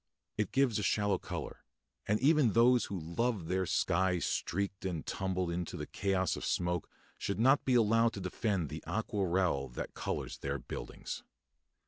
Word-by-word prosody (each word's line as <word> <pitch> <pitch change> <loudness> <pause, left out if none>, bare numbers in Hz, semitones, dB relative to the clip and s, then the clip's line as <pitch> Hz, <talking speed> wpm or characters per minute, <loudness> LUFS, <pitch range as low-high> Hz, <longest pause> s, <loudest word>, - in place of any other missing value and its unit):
It 105 -2 -1
gives 135 -5 +2
a - - -1
shallow 105 0 +2
colour; - - -6 0.4
and 105 +1 +2
even 140 -5 +4
those 120 +1 +5
who 95 -2 -4
love 95 +4 -1
their 95 +2 0
sky 90 +3 +2
streaked 100 +3 -2
and 90 -5 -3
tumbled 95 -2 -1
into 85 0 -3
the - - -4
chaos 95 -2 0
of - - -6
smoke 90 -2 -1 0.3
should 100 - -2
not 135 +5 +5
be 130 - +3
allowed 115 0 +4
to - - -5
defend 90 - -1
the - - -6
aquarelle 90 -8 0
that - - -4
colours - - -4
their 70 0 -2
buildings. 60 - -6
95 Hz, 160 wpm, -33 LUFS, 90-115 Hz, 0.4 s, those